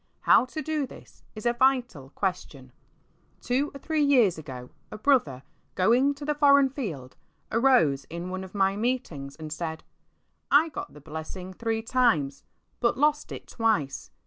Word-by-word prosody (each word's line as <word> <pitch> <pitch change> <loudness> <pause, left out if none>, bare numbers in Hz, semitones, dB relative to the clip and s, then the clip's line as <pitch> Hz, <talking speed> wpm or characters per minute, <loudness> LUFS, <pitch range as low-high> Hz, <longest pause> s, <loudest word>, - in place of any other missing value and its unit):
How - - +5
to 310 +4 -6
do 305 -3 -1
this - - -15
is 215 - -8
a 240 - +3
vital 245 - +1
question. 170 -9 -4 0.7
Two 265 +5 0
or - - -5
three 315 +2 -1
years 245 - +4
ago, 125 -4 -9 0.2
a 215 - -8
brother, 210 - +1 0.3
going 245 +9 +3
to 285 +1 -8
the 300 - +1
foreign 280 -2 +5
field, 170 - -6 0.4
arose 175 - +3
in 170 +2 -6
one 185 0 -4
of 190 +1 -11
my 195 0 +2
meetings 205 - -3
and 155 -1 -7
said, 160 -1 -5 0.4
'' - - -47 0.2
I - - -7
got - - -7
the 150 - -13
blessing 160 +5 -7
three 225 +2 -2
times 170 - +1 0.4
but 235 0 +1
lost 295 +1 +1
it - - -8
twice. 190 - -1
215 Hz, 165 wpm, -27 LUFS, 160-265 Hz, 0.7 s, How